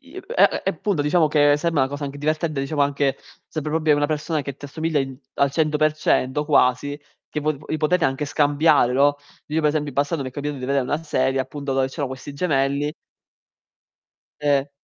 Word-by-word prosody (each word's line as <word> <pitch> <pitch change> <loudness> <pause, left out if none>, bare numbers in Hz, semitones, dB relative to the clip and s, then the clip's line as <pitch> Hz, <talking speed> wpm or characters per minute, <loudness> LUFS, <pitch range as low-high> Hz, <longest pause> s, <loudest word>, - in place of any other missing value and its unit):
E - - -10 0.2
e - - +4
e - - +1
punto 200 -8 -1
diciamo 155 +1 +3
che 145 -1 +4
sembra 165 -2 0
una 130 - +1
cosa 145 0 -4
anche 140 +1 -6
divertente, 155 0 -1
diciamo 145 +2 0
anche 140 -1 +1 0.3
sarebbe 155 -1 -4
proprio 155 -2 +2
una 145 - +1
persona 155 0 -2
che 140 -1 -6
ti - - -12
assomiglia 160 +1 -1
in 135 -1 -4 0.2
al 140 0 +2
100% 150 -2 +1
quasi, 145 0 +2 0.3
che 150 - -3
po 155 +1 +1
vi 155 - -2
potete 165 +2 +2
anche 135 +1 0
scambiare, 145 -3 +3
no, 140 +2 +3 0.3
io 155 +2 0
per 150 - +3
esempio 150 -1 -1
in 140 - -8
passato 145 +3 0
mi 130 - -4
è - - -10
capitato 145 0 -4
di 125 - -5
vedere 140 -1 +1
una 150 +5 -2
serie, 135 -3 0
appunto, 140 +1 -4
dove 135 0 +1
c'erano 135 0 -4
questi 130 +2 -8
gemelli 140 -2 0 1.5
E 145 -1 +1
145 Hz, 200 wpm, -22 LUFS, 140-155 Hz, 1.5 s, e